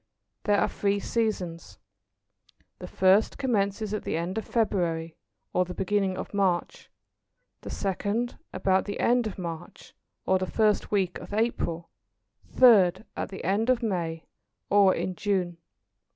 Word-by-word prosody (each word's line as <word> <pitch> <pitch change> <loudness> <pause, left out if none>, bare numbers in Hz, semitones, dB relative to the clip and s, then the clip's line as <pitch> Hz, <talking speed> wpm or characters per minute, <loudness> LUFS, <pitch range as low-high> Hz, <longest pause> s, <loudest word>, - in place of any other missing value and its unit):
There 205 -1 +3
are - - +2
three 200 0 0
seasons. 180 - -2 1.0
The - - -7
first 190 +3 +3
commences 215 -5 0
at 215 - -2
the - - -2
end 180 +6 -2
of - - -7
February, 170 -8 0 0.4
or 180 - +3
the 180 0 -7
beginning 195 -1 0
of - - -6
March; 190 -4 -1 0.7
the - - -8
second 205 +5 -2
about 190 0 +1
the 205 - -5
end 240 -1 +2
of 205 - -7
March, 170 -3 -8 0.3
or 190 0 +3
the 185 - -2
first 215 -2 +2
week 190 -4 0
of 205 - -7
April; 175 -7 -1 0.6
third 205 -6 +5
at - - -3
the 190 - -8
end 205 +6 +1
of 250 -2 +2
May, 170 -6 -2 0.5
or 200 -2 +5
in 185 - -2
June. 180 -3 -1
195 Hz, 145 wpm, -27 LUFS, 180-215 Hz, 1.0 s, third